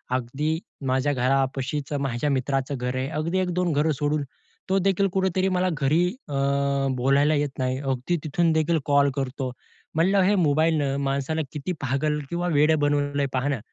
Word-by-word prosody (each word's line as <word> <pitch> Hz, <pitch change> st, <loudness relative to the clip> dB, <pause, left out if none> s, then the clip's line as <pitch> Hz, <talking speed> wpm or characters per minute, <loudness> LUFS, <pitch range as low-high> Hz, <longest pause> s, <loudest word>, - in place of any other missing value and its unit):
अगदी 145 Hz, +6 st, -1 dB, 0.3 s
माझ्या 130 Hz, +3 st, +1 dB
घरापाशीचं 135 Hz, +2 st, 0 dB
माझ्या 135 Hz, +1 st, -1 dB
मित्राचं 135 Hz, 0 st, -1 dB
घर 125 Hz, +1 st, -3 dB
आहे. 130 Hz, +1 st, -1 dB
अगदी 170 Hz, +4 st, 0 dB
1-2 180 Hz, -2 st, 0 dB
घरं 150 Hz, +2 st, +2 dB
सोडून. 145 Hz, 0 st, 0 dB, 0.5 s
तोदेखील 195 Hz, 0 st, +2 dB
कुठेतरी 190 Hz, 0 st, +1 dB
मला 185 Hz, +1 st, +2 dB
घरी 155 Hz, +6 st, +3 dB, 0.2 s
अ, 145 Hz, -, -5 dB, 0.6 s
बोलायला 140 Hz, +4 st, +3 dB
येत 145 Hz, -1 st, -2 dB
नाही. 130 Hz, 0 st, -1 dB
अगदी 135 Hz, +5 st, -1 dB
तिथून 165 Hz, +3 st, +1 dB
देखील 160 Hz, +1 st, +2 dB
कॉल 140 Hz, -1 st, +4 dB
करतो. 135 Hz, -1 st, -3 dB, 0.4 s
म्हणलं, 190 Hz, +5 st, +3 dB
हे 200 Hz, +3 st, +3 dB
मोबाईलनं 145 Hz, -2 st, +2 dB
माणसाला 140 Hz, +3 st, -1 dB
किती 150 Hz, +4 st, -4 dB
पागल 145 Hz, +3 st, 0 dB
किंवा 175 Hz, +1 st, -2 dB
वेडं 150 Hz, +1 st, +4 dB
बनवलय 145 Hz, -1 st, +1 dB
पाहा 130 Hz, +2 st, 0 dB
ना. 135 Hz, -5 st, -1 dB
145 Hz, 155 wpm, -25 LUFS, 135-160 Hz, 0.6 s, कॉल